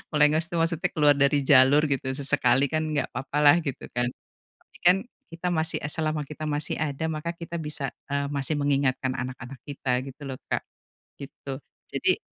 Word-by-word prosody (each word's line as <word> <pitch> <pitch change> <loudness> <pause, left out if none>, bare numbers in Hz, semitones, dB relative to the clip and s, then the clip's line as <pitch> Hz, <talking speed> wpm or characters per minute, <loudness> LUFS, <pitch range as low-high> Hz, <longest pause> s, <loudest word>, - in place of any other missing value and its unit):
Melengos 150 +2 +4
itu 175 - -6
maksudnya 170 +1 0
keluar 145 -2 +5
dari 140 +1 +3
jalur 135 +2 +6
gitu 130 -1 -1
sesekali, 140 -1 +2
kan, 155 0 0
nggak 145 - 0
papa 145 +2 -4
lah 145 +3 +8
gitu, 140 -6 -5
kan. 120 0 0 0.5
Tapi, - - -21
kan, 180 +2 +7 0.4
kita 180 +2 -2
masih 160 -2 0
eee, 145 - -2
selama 155 -1 0
kita 155 0 -8
masih 150 0 -1
ada 155 0 -2
maka 160 +2 -3
kita 170 0 -6
bisa, 150 -3 -3 0.2
eee, 140 0 0
masih 140 +2 -1
mengingatkan 135 -2 +1
anak-anak 130 0 -6
kita 130 -3 -1
gitu 135 +2 -11
loh, 130 - -6
Kak. - - 0 0.6
Gitu. 135 0 -7 0.3
Jadi - - +2
145 Hz, 175 wpm, -26 LUFS, 135-155 Hz, 0.6 s, lah